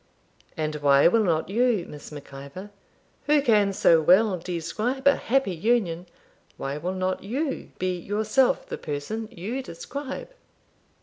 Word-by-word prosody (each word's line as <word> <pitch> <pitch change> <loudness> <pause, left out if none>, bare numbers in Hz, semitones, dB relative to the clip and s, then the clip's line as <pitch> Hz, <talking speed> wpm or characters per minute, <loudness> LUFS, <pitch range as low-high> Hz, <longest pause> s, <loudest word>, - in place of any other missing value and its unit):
'And 155 -1 -2
why 140 -1 +5
will 220 +5 +3
not 165 -5 +1
you, 225 -3 +2
Miss 150 0 -10
Mac 145 -2 -10
Ivor, 140 +9 -9 0.6
who 300 0 +5
can 215 -7 +3
so 170 -4 +4
well 190 +5 +5
describe 190 - -3
a 280 - +6
happy 260 -6 0
union, 180 -2 0 0.5
why 140 +2 -4
will 180 +4 -3
not 185 0 -2
you 270 +8 -3
be 185 -1 -1
yourself 215 +7 +1
the - - -6
person 160 +10 -4
you 225 +8 -4
describe?' 275 - -7
190 Hz, 140 wpm, -25 LUFS, 165-235 Hz, 0.6 s, a